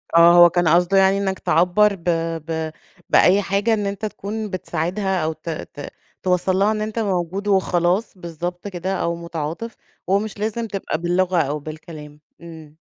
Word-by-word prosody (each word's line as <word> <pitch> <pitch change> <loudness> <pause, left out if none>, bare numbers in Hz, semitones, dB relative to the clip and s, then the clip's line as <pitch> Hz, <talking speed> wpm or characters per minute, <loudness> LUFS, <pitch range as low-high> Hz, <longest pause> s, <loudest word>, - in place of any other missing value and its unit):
آه، 170 +1 +8
هو 175 0 +8
كان 175 0 +1
قصده 175 +4 +3
يعني 195 0 +4
إنك 195 -1 -2
تعبّر 180 +5 +3
ب 170 - -18 0.4
ب 160 -1 -3 0.4
بأي 195 +3 +5
حاجة 200 +3 +1
إن 210 -2 -1
أنت 200 +1 -3
تكون 215 +1 -5
بتساعدها 185 +1 -2
أو 160 +1 -1
ت 160 +2 -9
ت 150 -2 -7 0.4
توصلّ 185 0 +1
لها 205 +2 +3
إن 215 -1 -2
أنت 215 +1 -3
موجود 195 -1 -2
وخلاص، 190 +1 +1
بالضبط 175 +2 -6
كده 185 0 -3
أو 170 -2 -1
متعاطف، 170 +6 -5 0.3
ومش 200 +2 0
لازم 225 +2 -2
تبقى 195 -6 -3
باللغة، 175 +2 0
أو 150 0 -2
بالكلام، 155 0 -10 0.2
إمم. 160 -3 -12
180 Hz, 165 wpm, -21 LUFS, 170-200 Hz, 0.4 s, آه